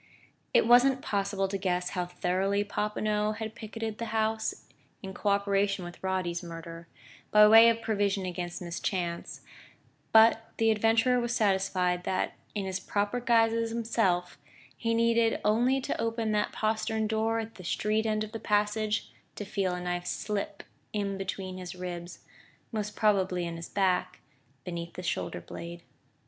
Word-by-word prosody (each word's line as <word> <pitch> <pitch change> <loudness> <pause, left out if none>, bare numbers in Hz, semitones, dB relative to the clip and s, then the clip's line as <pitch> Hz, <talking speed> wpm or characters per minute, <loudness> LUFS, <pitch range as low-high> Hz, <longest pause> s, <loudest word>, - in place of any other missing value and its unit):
It - - +4
wasn't 255 +3 +5
possible 200 -3 0
to 195 0 -3
guess 180 -1 -1
how 180 -2 -2
thoroughly 185 +3 0
Popinot 210 +1 -1
had 220 -1 -5
picketed 220 -1 -6
the 230 - -2
house, 220 0 -1 0.4
in 190 0 -6
co 205 - -1
operation 200 -1 +1
with 175 - -10
Roddy's 185 -2 -1
murderer, 165 0 -9 0.4
by 210 0 +7
way 225 +2 +9
of 230 0 -1
provision 200 -3 0
against 175 0 -4
mischance; 170 0 -3 0.7
but 225 0 +6
the 225 0 +4
adventurer 225 +3 +3
was 240 0 -1
satisfied 190 -4 +1
that, 185 - -1 0.2
in 200 -2 -2
his 190 0 -2
proper 205 +5 -1
guise 230 -2 +3
as 230 0 0
himself, 220 -8 0 0.4
he 230 -1 -1
needed 230 0 +3
only 240 +5 +3
to 260 - -3
open 225 -1 -1
that 210 0 +1
postern 220 0 -1
door 220 +1 0
at 225 0 -4
the 185 - -12
street 215 +5 0
end 215 0 0
of 215 - -7
the 225 - -5
passage, 210 +1 0 0.2
to 210 - -5
feel 190 -2 -1
a - - -4
knife 175 0 -3
slip 205 -1 -3 0.3
in 200 -2 -1
between 190 -1 -5
his 180 0 -7
ribs 175 -1 -7 0.5
most 210 -2 -3
probably 190 -4 +2
in 170 0 -4
his 165 0 -7
back, 180 -2 0 0.4
beneath 170 -1 -5
the 180 - -6
shoulder 170 - -2
blade.... 170 0 -8
205 Hz, 160 wpm, -29 LUFS, 180-225 Hz, 0.7 s, way